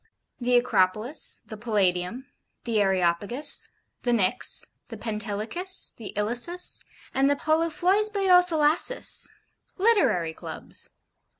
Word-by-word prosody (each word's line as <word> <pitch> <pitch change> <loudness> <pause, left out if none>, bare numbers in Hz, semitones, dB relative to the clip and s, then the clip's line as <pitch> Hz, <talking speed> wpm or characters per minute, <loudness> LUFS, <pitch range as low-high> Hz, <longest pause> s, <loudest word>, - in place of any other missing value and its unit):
The 245 0 +1
'Acropolis,' 225 +3 0
the 215 - -9
'Palladium,' 205 +1 -1 0.4
the 225 -3 0
'Areopagus,' 195 - +1 0.3
the 245 - -3
'Pnyx' 225 +2 +3 0.2
the - - -9
'Pentelicus,' 220 - 0
the 225 - -9
'Ilissus' 245 +12 +1 0.3
and 270 +1 +2
the 285 - +2
'Poluphloisboio 360 +5 +2
Thalasses' 325 +7 +1 0.5
Literary 265 - +2
Clubs. - - -7
245 Hz, 95 wpm, -25 LUFS, 210-335 Hz, 0.5 s, Pnyx